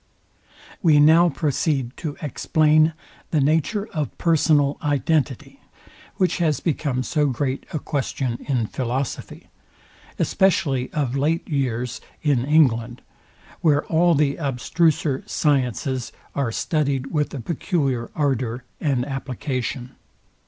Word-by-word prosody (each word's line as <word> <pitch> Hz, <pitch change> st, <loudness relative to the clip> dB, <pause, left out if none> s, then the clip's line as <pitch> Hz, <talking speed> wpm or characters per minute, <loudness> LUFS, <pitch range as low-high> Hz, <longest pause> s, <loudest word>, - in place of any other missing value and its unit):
We 155 Hz, -4 st, +5 dB
now 160 Hz, +4 st, +6 dB
proceed 140 Hz, -2 st, -1 dB
to 150 Hz, -4 st, -5 dB
explain 155 Hz, +2 st, +3 dB, 0.4 s
the 155 Hz, -, +1 dB
nature 160 Hz, +9 st, +1 dB
of 150 Hz, -3 st, -3 dB
personal 155 Hz, -4 st, +2 dB
identity, 145 Hz, -2 st, -1 dB, 0.6 s
which 185 Hz, -1 st, +1 dB
has 155 Hz, -4 st, +1 dB
become 145 Hz, -6 st, -1 dB
so 150 Hz, +2 st, +1 dB
great 135 Hz, +1 st, -2 dB
a -, -, -2 dB
question 135 Hz, -4 st, -3 dB
ill 125 Hz, -5 st, +1 dB
philosophy, 125 Hz, +3 st, -4 dB, 0.7 s
especially 140 Hz, -9 st, +1 dB
of 135 Hz, -4 st, -1 dB
late 155 Hz, +4 st, 0 dB
years 125 Hz, -4 st, -2 dB, 0.2 s
in 140 Hz, -6 st, +2 dB
England, 125 Hz, -6 st, +2 dB, 0.6 s
where 145 Hz, -3 st, +2 dB
all 170 Hz, +1 st, +3 dB
the 140 Hz, -1 st, +1 dB
abstruser 145 Hz, +1 st, 0 dB
sciences 130 Hz, -3 st, 0 dB, 0.2 s
are 140 Hz, -4 st, -1 dB
studyed 140 Hz, 0 st, -1 dB
with 150 Hz, -2 st, 0 dB
a -, -, -4 dB
peculiar 135 Hz, -, -1 dB
ardour 130 Hz, -5 st, -1 dB, 0.2 s
and 135 Hz, -5 st, 0 dB
application. 130 Hz, -2 st, -4 dB
140 Hz, 110 wpm, -23 LUFS, 130-155 Hz, 0.7 s, now